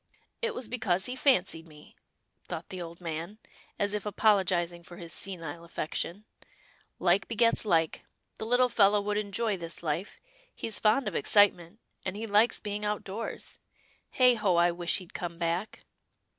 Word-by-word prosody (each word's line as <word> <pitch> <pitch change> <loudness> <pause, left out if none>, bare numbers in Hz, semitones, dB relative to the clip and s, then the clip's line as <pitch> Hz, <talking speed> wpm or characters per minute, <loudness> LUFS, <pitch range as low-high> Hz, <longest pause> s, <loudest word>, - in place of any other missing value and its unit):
" - - -44
It 465 -1 -1
was 245 - -4
because 215 -6 0
he 250 - -3
fancied 185 - +2
me," 150 -1 -16 0.5
thought - - -6
the 185 -1 -5
old 170 0 -8
man, 165 +4 -5 0.4
as 205 0 0
if 210 -2 -2
apologizing 185 -5 +2
for 175 0 -12
his 170 -1 -7
senile 170 -4 -4
affection. 170 +4 -4 0.4
" - - -29 0.3
Like 180 +2 +3
begets 230 0 +2
like. 165 -5 +1 0.4
The 220 - -4
little 245 +2 +4
fellow 205 -3 +4
would 205 +1 -1
enjoy 210 0 -1
this 170 -1 -7
Hfe 165 +4 -3 0.2
— - - -32
he's 220 - -2
fond 225 +5 +3
of - - -2
excitement, 205 -1 +3 0.2
and 190 0 -3
he 220 +2 -4
likes 215 +2 +3
being 210 0 -4
out 210 0 -1
doors. 210 +4 -6 0.6
Heigh 250 -1 +7
ho! 210 -6 +1
I 170 +1 +4
wish 170 0 0
he'd 185 -3 -10
come 170 -1 -5
back." 170 +5 -2
195 Hz, 170 wpm, -29 LUFS, 170-215 Hz, 0.6 s, Heigh